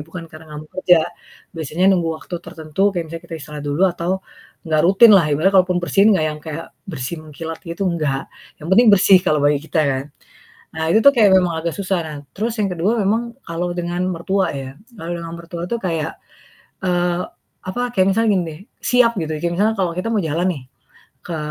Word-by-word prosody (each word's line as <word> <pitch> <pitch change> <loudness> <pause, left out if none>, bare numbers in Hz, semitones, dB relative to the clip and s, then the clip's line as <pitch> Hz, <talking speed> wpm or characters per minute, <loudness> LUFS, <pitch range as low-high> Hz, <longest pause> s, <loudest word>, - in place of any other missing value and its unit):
bukan 165 +1 -8
karena 155 +1 -12
gak - - -6
mau 155 - -17
kerja, 180 -2 +6 0.6
biasanya 160 +3 -1
nunggu 175 -3 +1
waktu 180 - -9
tertentu 155 +3 -4
kayak 175 -2 -1
misalnya 165 0 -7
kita 170 - -7
istirahat 150 0 -8
dulu 145 +5 0
atau 170 0 -3 0.6
enggak 155 -1 +2
rutinlah, 195 -1 +7
ibaratnya 160 +7 +2
kalaupun 180 -1 +2
bersin 195 +3 +3
enggak 165 -5 +1
yang 150 - -7
kayak 160 0 -6 0.2
bersih 155 -2 -4
mengkilat 160 +1 -7
gitu, 170 +3 -4
enggak. 150 -6 -1 0.4
Yang - - -7
penting 235 +5 +6
bersih 195 -1 +7
kalau 150 - +3
bagi 145 0 +3
kita 160 - +1
kan. 135 -1 -1 0.7
Nah 160 - -2
itu 220 - +5
tuh 280 - +10
kayak 215 -4 +6
memang 180 -2 +1
agak 170 0 -2
susah. 190 -2 -1
Nah 150 -1 -7 0.2
terus 220 +3 -1
yang 200 -2 +1
ke-2 180 +7 0
memang 225 +4 0
kalau 170 +1 -2
dengan 175 0 -2
mertua 190 +3 0
ya, 135 -1 -5 0.3
kalau 170 0 -5
dengan 165 -1 -7
mertua 170 0 -7
tuh 235 - +1
kayak, 165 -6 -3 0.7
eee, 175 -1 +1 0.5
apa, 185 +6 -3
kayak 190 -1 +4
misalnya 225 +3 +2
gini 185 - +1
deh, 155 - -11 0.2
siap 245 -2 +4
gitu. 160 -1 -3
Kayak 170 0 -1
misal 205 +4 +3
kalau 185 -3 0
kita 185 +5 -2
mau 215 - +2
jalan 165 +2 -1
nih 140 -5 -9 0.6
ke 170 - -4
175 Hz, 200 wpm, -20 LUFS, 160-190 Hz, 0.7 s, tuh